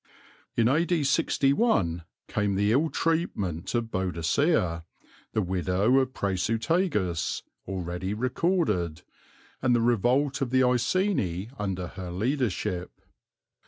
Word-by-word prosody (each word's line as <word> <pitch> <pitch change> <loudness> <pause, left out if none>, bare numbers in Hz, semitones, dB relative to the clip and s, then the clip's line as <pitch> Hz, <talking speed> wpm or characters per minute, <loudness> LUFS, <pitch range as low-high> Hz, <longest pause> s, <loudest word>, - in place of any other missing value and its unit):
In 115 -1 +4
A.D. 165 +4 +2
61 135 - +2 0.2
came 105 -1 0
the 100 +2 +2
ill 150 +7 +3
treatment 115 - -1
of 115 -1 -1
Boadicea, 90 - +1 0.5
the 110 - +1
widow 95 - +2
of 130 0 -1
Prasutagus, 105 - 0 0.2
already 95 +1 -3
recorded, 115 - 0 0.6
and 125 -2 +3
the - - +3
revolt 125 +5 +2
of 135 - 0
the 130 +1 +3
Iceni 125 - +1
under 95 -3 -2
her 90 -1 -7
leadership. 95 -3 -2
110 Hz, 105 wpm, -27 LUFS, 90-135 Hz, 0.6 s, In